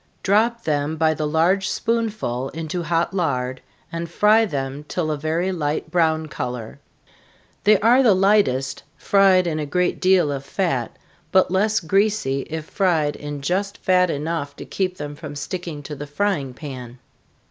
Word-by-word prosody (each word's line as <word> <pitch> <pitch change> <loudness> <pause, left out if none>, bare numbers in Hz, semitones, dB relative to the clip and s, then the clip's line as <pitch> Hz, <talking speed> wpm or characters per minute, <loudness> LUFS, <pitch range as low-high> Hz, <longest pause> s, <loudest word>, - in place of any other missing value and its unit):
Drop 230 +4 +2
them 150 0 0
by 160 0 +2
the 155 -1 -2
large 175 +5 +2
spoonful 215 - -1
into 165 +2 -3
hot 170 +2 0
lard, 130 -8 -1 0.3
and 170 0 -4
fry 215 +6 +4
them 140 -4 -4
till 160 -3 -2
a - - 0
very 160 +5 -1
light 155 -4 -2
brown 160 -2 +2
color. 125 -5 -5 0.9
They 210 -1 +6
are 240 +5 +5
the 225 -7 +5
lightest 185 -10 +2 0.2
fried 195 -2 +4
in 160 -2 -1
a 150 - -2
great 180 +5 0
deal 185 -5 +4
of 140 -1 -4
fat, 140 - -2 0.3
but 190 -1 +4
less 210 +3 +2
greasy 195 -6 0
if 160 -1 -4
fried 160 -7 +1
in 145 -1 -6
just 200 +5 -1
fat 180 -1 +3
enough 145 -1 -3
to - - -9
keep 185 -1 -2
them 145 0 -6
from 150 -1 -8
sticking 150 0 -5
to 150 +1 -6
the 145 +1 -7
frying 145 -5 -1
pan. 130 -4 -8
165 Hz, 160 wpm, -22 LUFS, 145-190 Hz, 0.9 s, They